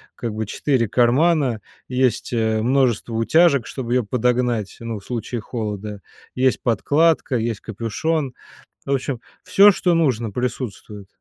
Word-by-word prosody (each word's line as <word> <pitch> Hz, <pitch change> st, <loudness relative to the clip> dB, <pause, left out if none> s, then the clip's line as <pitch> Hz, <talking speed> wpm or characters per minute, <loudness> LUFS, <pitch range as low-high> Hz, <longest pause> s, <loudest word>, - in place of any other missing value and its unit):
как 115 Hz, -3 st, -4 dB
бы, 110 Hz, +1 st, -3 dB
4 115 Hz, +2 st, 0 dB
кармана, 130 Hz, -, +2 dB, 0.3 s
есть, 125 Hz, -2 st, 0 dB
э, 110 Hz, -2 st, +1 dB
множество 125 Hz, -2 st, +1 dB
утяжек, 140 Hz, +3 st, +3 dB
чтобы 125 Hz, -3 st, -4 dB
её 125 Hz, -1 st, +2 dB
подогнать, 120 Hz, -2 st, 0 dB
ну, 115 Hz, -2 st, -5 dB
в -, -, -19 dB
случае 120 Hz, -1 st, -4 dB
холода, 105 Hz, -3 st, -5 dB, 0.3 s
есть 130 Hz, 0 st, +1 dB
подкладка, 145 Hz, +5 st, +2 dB
есть 115 Hz, -2 st, -2 dB
капюшон. 125 Hz, +7 st, -2 dB, 0.5 s
В -, -, -3 dB
общем, 135 Hz, -2 st, -2 dB, 0.2 s
всё, 205 Hz, +1 st, +6 dB
что 180 Hz, -1 st, +1 dB
нужно, 125 Hz, -9 st, +1 dB
присутствует. 110 Hz, -4 st, -5 dB
120 Hz, 135 wpm, -21 LUFS, 110-135 Hz, 0.5 s, всё